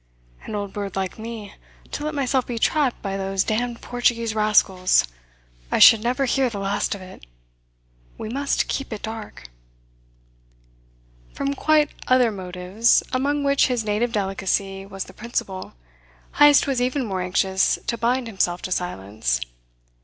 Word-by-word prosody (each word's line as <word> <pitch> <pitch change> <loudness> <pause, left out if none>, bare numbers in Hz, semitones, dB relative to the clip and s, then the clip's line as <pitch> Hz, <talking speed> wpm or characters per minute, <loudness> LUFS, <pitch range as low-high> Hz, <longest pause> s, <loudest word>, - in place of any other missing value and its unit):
"An 215 - -5
old 200 -1 -4
bird 200 -2 -5
like 190 +2 -3
me! 220 -2 -7 0.4
To 295 - -4
let 305 0 -3
myself 265 -2 0
be 240 - -4
trapped 275 +2 +1
by 195 -1 -2
those 195 0 0
damned 235 +2 -2
Portuguese 235 -2 0
rascals! 200 - +3 0.6
I - - +2
should 225 - +8
never 250 +4 0
hear 265 0 +1
the 220 - -6
last 200 +1 -1
of 195 - -10
it. 185 - -13 0.9
We - - -6
must 280 +5 -1
keep 275 -2 -3
it 215 - -6
dark." 220 - -7 1.9
From 280 0 -1
quite 300 +1 +2 0.2
other 255 -2 +4
motives, 185 +3 +1
among 285 +3 0
which 280 0 +3
his 245 -4 -1
native 215 +3 0
delicacy 195 -1 -2
was 195 -1 -5
the - - -14
principal, 200 -5 -4 0.7
Heyst 290 -1 +7
was 270 -3 0
even 255 +1 0
more 190 -4 -3
anxious 190 +1 +1
to - - -1
bind 240 +3 0
himself 185 -5 -1
to 185 - -5
silence. 100 - -2
220 Hz, 150 wpm, -23 LUFS, 195-250 Hz, 1.9 s, should